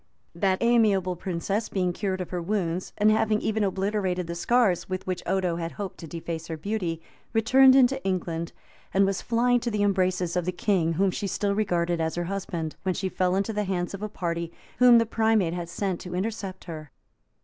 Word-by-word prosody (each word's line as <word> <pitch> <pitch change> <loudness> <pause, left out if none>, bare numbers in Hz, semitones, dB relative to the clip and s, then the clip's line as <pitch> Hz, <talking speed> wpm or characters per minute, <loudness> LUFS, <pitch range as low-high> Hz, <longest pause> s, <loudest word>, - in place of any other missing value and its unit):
That 185 +2 +1
amiable 210 -6 +3
princess 190 +5 -2
being 180 -2 0
cured 190 -1 -2
of 180 - -6
her 180 -1 -2
wounds, 180 -1 -2
and 215 +1 +4
having 220 0 +2
even 220 0 0
obliterated 190 -2 -1
the 170 - -5
scars 195 +1 +2
with 185 0 -3
which 185 -1 -3
Odo 185 -3 0
had 165 -1 -4
hoped 200 -3 -6
to 165 - -8
deface 165 0 -5
her 160 - -4
beauty, 170 -3 -3 0.3
returned 260 +4 +6
into 270 0 +4
England, 170 -3 -2 0.4
and 195 +1 +5
was 195 -1 -1
flying 245 +1 +2
to 240 - -2
the 210 -2 0
embraces 185 -3 +1
of 180 -2 0
the 180 - 0
king, 175 -2 +1
whom 190 +3 +2
she 200 - -3
still 200 +1 0
regarded 175 -5 0
as 160 0 -1
her 175 - -1
husband; 170 -4 -4
when 185 -1 -1
she 190 -1 -2
fell 185 0 +1
into 200 +3 0
the 210 0 -1
hands 180 -1 -2
of 195 - -6
a 215 - -3
party 170 -4 -3 0.3
whom 250 -1 +8
the 230 - +4
primate 220 -6 +2
had 175 -1 -4
sent 185 0 -2
to 180 -1 -6
intercept 195 -1 -4
her. 155 -4 -8
190 Hz, 205 wpm, -26 LUFS, 175-210 Hz, 0.4 s, whom